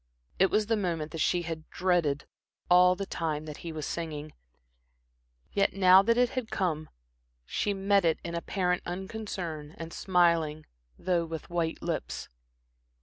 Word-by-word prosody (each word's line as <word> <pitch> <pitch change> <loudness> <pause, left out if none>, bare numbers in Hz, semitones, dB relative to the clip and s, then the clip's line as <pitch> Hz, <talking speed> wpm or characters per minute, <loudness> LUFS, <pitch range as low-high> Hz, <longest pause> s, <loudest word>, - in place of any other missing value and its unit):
It 190 +1 +5
was 210 0 +2
the 225 +2 +1
moment 170 -6 -2
that 165 - -5
she 175 +2 +2
had 160 -1 -6
dreaded 175 -6 +1 0.5
all 180 +1 +7
the 195 +2 -4
time 155 -4 -3
that 150 -2 -7
he 170 - -6
was 155 -2 -4
singing, 155 -3 -5 1.2
yet 200 0 +2
now 185 -1 +7
that 230 +4 +2
it 245 0 +4
had 255 -4 -3
come, 160 -5 -1 0.6
she 205 - -1
met 195 0 +3
it 165 -2 +2
in 170 - -5
apparent 180 +1 0
unconcern, 175 -5 -5
and 165 0 -7
smiling, 170 -4 +2 0.3
though 175 -2 0
with 165 +1 -7
white 170 -2 -1
lips. - - -3
175 Hz, 150 wpm, -29 LUFS, 160-190 Hz, 1.2 s, all